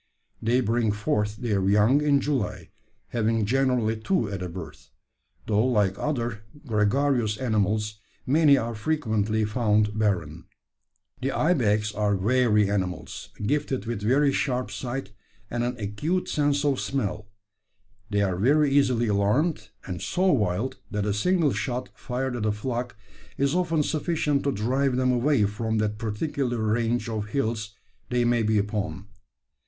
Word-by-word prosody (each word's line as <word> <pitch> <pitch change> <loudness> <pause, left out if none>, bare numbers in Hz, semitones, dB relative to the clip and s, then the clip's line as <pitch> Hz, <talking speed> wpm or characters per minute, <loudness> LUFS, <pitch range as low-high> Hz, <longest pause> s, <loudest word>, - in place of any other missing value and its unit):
They 120 +3 +2
bring 115 -1 +1
forth 105 0 -1
their 105 -4 -1
young 105 +8 +4
in 145 -2 +3
July, 120 -8 -2 0.4
having 115 -1 +1
generally 125 -2 +1
two 110 - 0
at 95 -2 -4
a 90 - -4
birth; 85 -1 -9 0.6
though, 105 0 +2
like 105 -7 +2
other 120 -7 -2 0.2
gregarious 115 0 +1
animals, 105 -2 0 0.3
many 145 +1 +5
are 115 -1 -2
frequently 110 -4 0
found 105 -1 +1
barren. 85 -7 -1 0.8
"`The 135 - 0
ibex 110 -11 +1
are 105 -1 +1
wary 105 0 +3
animals, 95 -4 -3 0.2
gifted 135 -3 -1
with 115 -3 -3
very 135 +6 +3
sharp 125 -5 -1
sight 125 +2 -5 0.4
and 120 0 -1
an 125 0 -2
acute 130 - -2
sense 145 -1 +1
of 140 -2 +1
smell. 105 -5 -2 0.8
They 100 -1 +1
are 95 -3 0
very 140 +8 +3
easily 130 -4 +3
alarmed, 105 +5 +1 0.2
and 90 -2 -5
so 185 +1 +1
wild, 105 0 0
that 105 -1 -2
a 105 - 0
single 160 - +2
shot 125 -1 -3
fired 125 0 -3
at 110 -3 -1
a - - +2
flock 120 +2 -4 0.4
is 140 +1 +1
often 165 -4 +1
sufficient 150 -2 0
to 140 - +2
drive 130 +4 0
them 130 0 +2
away 125 -2 +2
from 110 +2 -2
that 105 -1 -1
particular 120 +3 -2
range 115 +2 0
of 110 -2 -3
hills 110 -3 -2 0.3
they 125 -1 +1
may 120 -1 +2
be 110 0 +2
upon. 105 -1 -2
115 Hz, 145 wpm, -26 LUFS, 105-135 Hz, 0.8 s, many